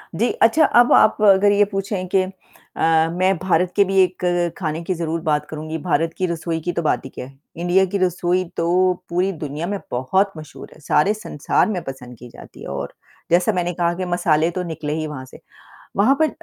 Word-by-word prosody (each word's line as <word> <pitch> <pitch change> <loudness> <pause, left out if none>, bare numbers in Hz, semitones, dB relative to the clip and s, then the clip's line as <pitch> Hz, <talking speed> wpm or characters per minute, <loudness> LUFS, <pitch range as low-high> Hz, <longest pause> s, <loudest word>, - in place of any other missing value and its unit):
जी, 235 +6 +1
अच्छा 295 +7 +4
अब 240 -1 +4
आप 215 - +5
अगर 205 0 +5
ये 205 0 +4
पूछे 195 -1 -3
कि 190 - +5
अ, 165 -3 -2
मैं 185 +1 +1
भारत 180 -1 +1
के 200 - +5
भी 195 0 -2
एक 175 -2 +1
ख़ाने 160 -2 -3
की 185 - -2
ज़रूर 165 -1 -3
बात 150 -2 0
करूँगी, 155 +1 -5
भारत 165 0 -1
की 185 - 0
रसोई 165 -1 -3
की 175 - -2
तो 170 - -1
बात 155 - 0
ही - - -7
क्या 125 - -8
है। 135 +1 -16 0.2
इंडिया 175 +2 +2
की 200 - -1
रसोई 180 0 0
तो 180 +2 +2 0.2
पूरी 180 +3 0
दुनिया 155 0 -5
में 200 -1 -3
बहुत 190 +11 +1
मशहूर 155 - -11
है, - - -19
सारे 155 +7 +2
संसार 210 -7 -1
में 185 -5 -2
पसंद 125 -3 -9
की 125 0 -12
जाती - - -14
है - - -8
और 70 +1 -5 0.4
जैसा 180 +5 +3
मैंने 175 -1 -1
कहा 170 0 0
कि 185 0 -3
मसाले 170 -2 +1
तो 180 +1 -3
निकले 155 -3 -4
ही 155 -1 -3
वहाँ 130 -3 -7
से। - - -15 0.6
वहाँ 225 +8 +4
पर 310 - +4
175 Hz, 210 wpm, -20 LUFS, 155-190 Hz, 0.6 s, आप